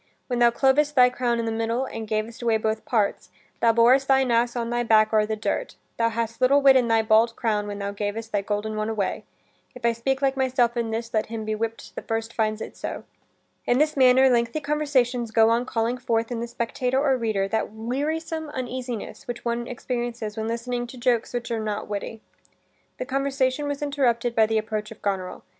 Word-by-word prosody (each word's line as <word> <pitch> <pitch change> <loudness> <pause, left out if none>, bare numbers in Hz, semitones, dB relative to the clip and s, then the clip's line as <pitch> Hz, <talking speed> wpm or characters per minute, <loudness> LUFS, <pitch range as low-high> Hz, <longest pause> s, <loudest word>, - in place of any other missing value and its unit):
When 245 -2 -2
thou 240 0 +6
clovest 280 +5 +2
thy 250 -1 +6
crown 245 -2 0
i' - - -1
the 225 - -1
middle, 225 +3 -1
and 225 -4 -6
gavest 220 +3 -3
away 230 -2 +2
both 220 0 -2
parts, 225 -9 0 0.3
thou 230 - +4
borest 245 +4 +4
thine 265 -2 +3
ass 235 +1 +2
on 235 -1 -2
thy 240 0 0
back 220 -2 +4
o'er 215 -1 +3
the 220 - -1
dirt: 220 - -3 0.2
thou 230 0 +2
hadst 230 +1 -3
little 275 +3 +5
wit 275 -1 +6
in 250 -2 +4
thy 225 -1 +3
bald 225 +1 +3
crown 210 -3 -1
when 205 0 -5
thou 200 0 -3
gavest 210 +2 -4
thy 205 - +1
golden 210 +2 -3
one 215 +1 -2
away. 215 -3 -2 0.5
If 250 -1 -7
I 235 - +5
speak 265 +4 -1
like 270 -1 +1
myself 255 -2 +1
in 235 -1 -1
this, 230 +1 -4
let 215 -1 +1
him 225 -1 -5
be 215 - -1
whipp'd 225 +1 -4
that - - -8
first 225 0 -2
finds 215 -1 -1
it - - -7
so." - - -5 0.6
In 245 - +3
this 305 +2 +2
manner 260 0 +6
lengthy 235 +3 +1
conversations 270 -5 0
go 225 0 +4
on 240 +2 +1
calling 235 +2 -1
forth 230 -2 -1
in 235 - -2
the 235 - -3
spectator 250 +2 -1
or 275 -2 +3
reader 215 -5 -1
that 220 0 -1
wearisome 300 +8 -3
uneasiness 255 -3 -5
which 240 0 -6
one 235 0 -1
experiences 240 -3 -4
when 220 0 -3
listening 240 +1 -3
to 250 - -11
jokes 240 -1 +1
which 240 -1 -4
are 230 - -1
not 215 -1 -3
witty. 210 +2 -5 0.8
This 255 - -5
conversation 275 +1 0
was 285 0 -3
interrupted 245 -5 +1
by 220 -1 +4
the 220 0 +1
approach 215 -1 -3
of 220 - -13
Goneril. 190 -2 -3
235 Hz, 215 wpm, -24 LUFS, 220-255 Hz, 0.8 s, thou